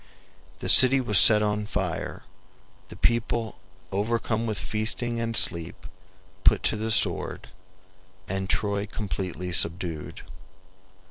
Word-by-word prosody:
The - - -5
city 130 +1 +8
was 105 -6 +5
set 105 -2 +6
on 105 0 -2
fire; 95 -6 -5 0.6
the - - -12
people, 115 -1 -2 0.3
overcome 115 +3 -2
with 110 -2 -3
feasting 115 +2 -3
and 115 0 -3
sleep, 85 -1 +1 0.6
put - - +3
to - - 0
the 110 +1 -4
sword, 110 - 0 0.8
and 95 0 -5
Troy 100 0 -2
completely 90 -4 -6
subdued. 85 -2 -1
105 Hz, 115 wpm, -25 LUFS, 95-115 Hz, 0.8 s, city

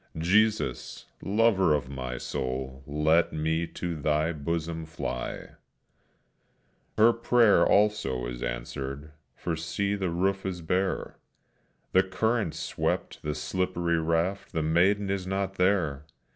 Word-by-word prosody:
"Jesus, 100 - +1 0.2
lover 100 -6 +3
of 70 - -3
my 65 -2 -5
soul, 65 +1 -4
Let 75 +3 +2
me 80 +2 0
to 85 0 -4
Thy 75 +2 +1
bosom 80 +1 -3
fly," 60 -6 -4
etc. - - -14 1.4
Her 115 +2 +6
prayer, 115 -6 +4
also, 100 -13 +2
is - - -6
answered, 65 +5 -5 0.2
for 85 - -3
see, 100 +6 -2
the 95 -3 -1
roof 95 +3 0
is 90 -2 -4
bare! 95 +3 -1 0.7
The 95 - +6
current 110 0 0
swept - - -2
the 75 -1 -3
slippery 85 +2 -1
raft, 85 +4 -1
the 80 - 0
maiden 95 +5 +2
is 95 -2 -2
not 95 0 -2
there! 80 -7 +1
85 Hz, 125 wpm, -28 LUFS, 75-95 Hz, 1.4 s, Her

